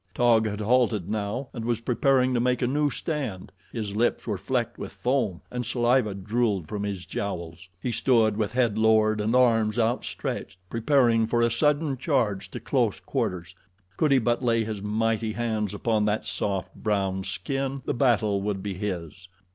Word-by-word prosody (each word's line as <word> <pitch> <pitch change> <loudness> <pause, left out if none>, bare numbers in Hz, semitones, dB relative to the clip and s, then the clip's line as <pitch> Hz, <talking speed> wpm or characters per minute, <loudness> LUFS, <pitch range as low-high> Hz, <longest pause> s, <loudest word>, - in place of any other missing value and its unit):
Taug 115 -2 +4
had 105 0 -4
halted 110 -4 +2
now 110 +5 -3
and 115 - -5
was 115 -1 0
preparing 130 +1 +2
to 120 - +2
make 125 +1 +1
a - - +4
new 145 +4 +1
stand. 135 - -4 0.2
His 105 -3 -4
lips 120 +3 +1
were 105 -5 -2
flecked 120 +1 -2
with - - -6
foam, 120 -9 -1
and 125 0 -3
saliva 120 -2 +1
drooled 100 -3 -1
from 105 +3 -4
his 100 -3 -4
jowls. 85 -2 -5
He 125 - -2
stood 115 -2 +3
with 105 0 -1
head 120 -4 +1
lowered 110 -1 +3
and 110 +4 +1
arms 115 -3 +3
outstretched, 115 -4 -2
preparing 115 -2 +3
for 120 +1 +2
a 115 - +2
sudden 150 +2 +1
charge 120 - 0
to - - -6
close - - 0
quarters. 90 -1 -3 0.4
Could 150 +6 +2
he 135 - +6
but 120 0 +1
lay 115 -2 +2
his 110 -2 -5
mighty 110 +1 0
hands 110 -3 -1
upon 105 +1 0
that 105 +1 0
soft, 95 -3 -2
brown 95 -3 -1
skin 135 +7 -3
the - - 0
battle 110 -6 +2
would 100 -1 -2
be 100 -1 -3
his. 90 -2 -5
110 Hz, 175 wpm, -26 LUFS, 105-125 Hz, 0.4 s, he